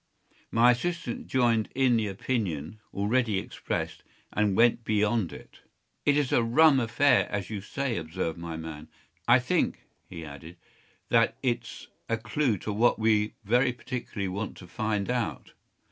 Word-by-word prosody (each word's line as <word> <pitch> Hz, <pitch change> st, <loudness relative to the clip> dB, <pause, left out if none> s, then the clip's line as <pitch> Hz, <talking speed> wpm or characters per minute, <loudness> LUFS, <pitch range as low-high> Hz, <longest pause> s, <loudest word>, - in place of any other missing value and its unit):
My 120 Hz, +2 st, +5 dB
assistant 175 Hz, -, -3 dB
joined 120 Hz, -4 st, +2 dB
in 130 Hz, -2 st, +4 dB
the 110 Hz, -2 st, +1 dB
opinion 95 Hz, -, -3 dB
already 110 Hz, +1 st, +1 dB
expressed, -, -, -4 dB, 0.3 s
and 105 Hz, -2 st, +1 dB
went 120 Hz, 0 st, +4 dB
beyond 105 Hz, -2 st, +1 dB
it. -, -, -12 dB, 0.5 s
“It 145 Hz, 0 st, +5 dB
is 145 Hz, -3 st, +1 dB
a -, -, +4 dB
rum 135 Hz, +5 st, +5 dB
affair, 120 Hz, +2 st, +3 dB
as 100 Hz, 0 st, -3 dB
you 105 Hz, -2 st, -3 dB
say,” 130 Hz, +3 st, -2 dB
observed 80 Hz, 0 st, -3 dB
my 85 Hz, -1 st, -5 dB
man. 80 Hz, -2 st, -7 dB, 0.4 s
“I -, -, +7 dB
think,” -, -, 0 dB, 0.2 s
he 80 Hz, -1 st, -7 dB
added, 75 Hz, +4 st, -10 dB, 0.5 s
“that -, -, +3 dB
it’s 120 Hz, -2 st, -2 dB, 0.2 s
a 115 Hz, -, +1 dB
clue 120 Hz, 0 st, 0 dB
to 105 Hz, -, -1 dB
what 115 Hz, +4 st, +3 dB
we 110 Hz, -1 st, +2 dB
very 125 Hz, +5 st, +3 dB
particularly 115 Hz, -4 st, -5 dB
want 100 Hz, +3 st, -4 dB
to 95 Hz, -, -11 dB
find 105 Hz, +2 st, -2 dB
out. 125 Hz, -3 st, -3 dB
110 Hz, 150 wpm, -28 LUFS, 100-125 Hz, 0.5 s, I